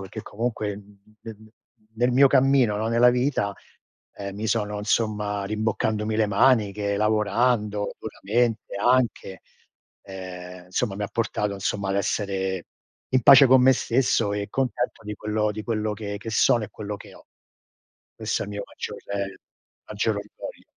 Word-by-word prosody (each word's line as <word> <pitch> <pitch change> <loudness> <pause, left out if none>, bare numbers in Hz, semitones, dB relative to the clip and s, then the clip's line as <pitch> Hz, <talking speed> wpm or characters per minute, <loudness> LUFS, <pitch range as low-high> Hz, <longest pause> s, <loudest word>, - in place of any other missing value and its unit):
perché 100 +3 -8
comunque, 110 -2 -3
mh - - -9 0.4
mh 115 - -7
mh 110 0 -13
mh, - - -17 0.5
nel 120 +2 +2
mio 135 +2 +6
cammino, 130 -6 +3
no, 110 +2 -1
nella 120 +1 +5
vita, 125 -5 0 0.6
ehm, 100 -1 -6
mi 110 +1 -3
sono, 105 -2 -1
insomma, 105 -1 -1
rimboccandomi 110 +1 -1
le 110 -1 +3
maniche, 100 -2 +2
lavorando 105 0 +1
duramente 110 +1 -1
anche, 120 -4 +1 0.6
ehm, 90 -2 -9
insomma, 95 +3 -2
mi 105 - -2
ha 100 - -5
portato, 105 -2 -1
insomma, 100 0 -2
ad 95 - 0
essere 95 -2 -2 0.4
in 130 -2 +2
pace 135 +2 +9
con 130 0 +6
me 130 +1 +7
stesso 115 -4 +1
e 100 0 -3
contento 125 -1 -2
di 105 0 -5
quello 105 0 -1
di 110 +1 -6
quello 110 -2 -2
che 100 -1 -5
che 110 +2 -7
sono 110 +1 +3
e 105 - -11
quello 105 -1 -6
che - - -14
ho. - - -17 0.9
Questo - - -2
è - - -5
il - - -8
mio 100 0 -4
maggior - - -7 0.9
maggior 105 +1 -1
orgoglio. 100 +1 -9
105 Hz, 160 wpm, -24 LUFS, 100-115 Hz, 0.9 s, pace